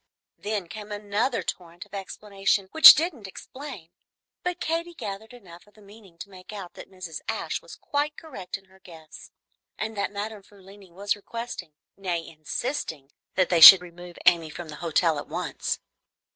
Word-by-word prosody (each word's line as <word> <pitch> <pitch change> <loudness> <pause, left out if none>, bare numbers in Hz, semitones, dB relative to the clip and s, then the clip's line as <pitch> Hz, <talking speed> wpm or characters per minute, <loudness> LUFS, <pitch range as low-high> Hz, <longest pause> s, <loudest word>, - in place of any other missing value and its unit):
Then 205 -3 -3
came 210 +4 -9
another 205 +2 -1
torrent 170 -1 -7
of - - -27
explanation 200 0 -2
which 320 - +11
didn't 300 - -3
explain; 230 - -10 0.5
but 360 -1 -3
Katy 335 +1 -3
gathered 205 -3 -7
enough 190 -7 -15
of 210 - -24
the 215 - -19
meaning 200 -4 -17
to 200 - -10
make 185 +1 -13
out 195 -4 -8
that - - -12
Mrs. 185 -4 -8
Ashe - - -3
was - - -12
quite 295 +1 -3
correct 250 - -7
in 195 - -23
her 190 0 -23
guess, 160 -4 -14 0.5
and 220 +1 -4
that 200 0 -2
Madame 210 +1 -6
Frulini 195 -1 -17
was 200 +4 -2
requesting, 230 -5 -8 0.2
nay, 175 -4 -4
insisting, 155 - -5 0.2
that 185 -2 +2
they 170 -2 +2
should 180 +3 +12
remove 175 0 -12
Amy 165 -2 +4
from 165 +1 -9
the 150 - -9
hotel 165 -2 +1
at - - -8
once. - - -3
195 Hz, 170 wpm, -25 LUFS, 175-215 Hz, 0.5 s, should